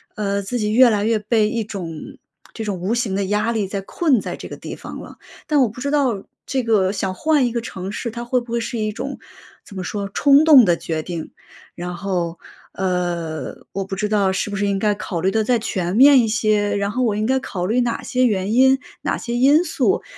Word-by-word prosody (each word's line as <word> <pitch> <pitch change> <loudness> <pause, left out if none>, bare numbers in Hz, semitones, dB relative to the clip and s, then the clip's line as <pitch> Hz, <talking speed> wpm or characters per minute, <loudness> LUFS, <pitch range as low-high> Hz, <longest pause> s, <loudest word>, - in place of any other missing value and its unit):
呃， 200 -1 -1
自 220 +5 -3
己 210 -1 0
越 250 +2 +7
来 210 -2 0
越 225 0 +2
被 215 0 +1
一 230 -1 -2
种 175 -7 -7 0.4
这 225 - -5
种 205 -4 -3
无 190 +6 -1
形 235 -5 -1
的 200 0 0
压 210 +4 0
力 215 -4 -1
在 195 +1 -4
困 265 - +1
在 - - -5
这 - - -9
个 - - -8
地 - - -7
方 - - -9
了。 - - -11 0.3
但 300 -2 +2
我 255 - +4
不 230 +4 -10
知 280 - -1
道， 260 -9 +1 0.2
这 265 - -1
个 210 -5 +2
想 195 -2 -2
换 305 -2 +2
一 - - -3
个 235 0 -2
城 190 -4 -6
市， 230 +2 -4
它 235 +1 -6
会 250 +1 +1
不 240 -1 -11
会 235 - 0
是 230 +1 -4
一 215 -1 -1
种 260 +6 -5 0.5
怎 200 - -13
么 185 - -4
说， 200 +2 -4
冲 285 +1 +5
动 295 -6 +9
的 175 -2 +2
决 160 -1 -3
定。 165 -1 -6 0.4
然 175 0 -6
后， 175 -3 -2 0.4
呃， 175 -5 -2 0.2
我 195 - -3
不 195 - -5
知 210 +2 -1
道 205 -2 +2
是 195 +2 -2
不 - - -3
是 200 +1 0
应 200 -1 0
该 210 +1 +1
考 200 -4 -4
虑 190 +2 +1
得 220 +2 +1
再 240 +3 +2
全 185 -5 -2
面 270 +2 +7
一 225 - 0
些， 215 -2 +1
然 200 0 -1
后 255 - -2
我 220 -4 +1
应 215 +1 -1
该 265 +3 +2
考 180 -8 -4
虑 230 +6 +1
哪 240 -1 -2
些 255 0 0
原 200 -1 -1
因、 265 +2 +5 0.2
哪 - - -1
些 235 - -5
因 280 +7 +5
素， 355 - 0
210 Hz, 260 characters per minute, -20 LUFS, 195-240 Hz, 0.5 s, 动